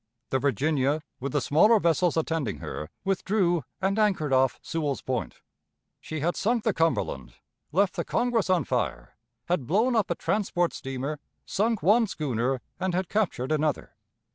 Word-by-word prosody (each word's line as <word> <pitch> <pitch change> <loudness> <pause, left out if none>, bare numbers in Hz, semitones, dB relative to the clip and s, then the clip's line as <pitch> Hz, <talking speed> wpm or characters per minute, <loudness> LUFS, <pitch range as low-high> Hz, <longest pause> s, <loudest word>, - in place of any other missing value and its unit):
The 130 - +2
Virginia, 145 +2 +1 0.2
with 135 +1 -3
the 145 - +2
smaller 210 - +5
vessels 170 -1 +2
attending 160 -8 -1
her, 75 - -6 0.2
withdrew 190 -3 +1 0.2
and 195 +2 0
anchored 185 -10 +2
off 130 0 +3
Sewell's 150 -4 -2
Point. 130 -2 -3 0.6
She 155 -2 -5
had 170 +3 0
sunk 230 +2 +1
the 220 - +2
Cumberland, 65 - -1 0.4
left 190 +4 +2
the - - 0
Congress 240 -5 0
on 185 -2 +3
fire, - - -2 0.3
had 170 -8 -1
blown 225 - +2
up 220 -3 +2
a 175 - 0
transport 175 -4 0
steamer, 135 +3 -4 0.3
sunk 215 -1 0
one 220 +6 +5
schooner, 130 - -1 0.2
and 185 -2 -1
had 185 -1 -1
captured 175 - 0
another. 155 -1 -1
165 Hz, 155 wpm, -27 LUFS, 140-195 Hz, 0.6 s, smaller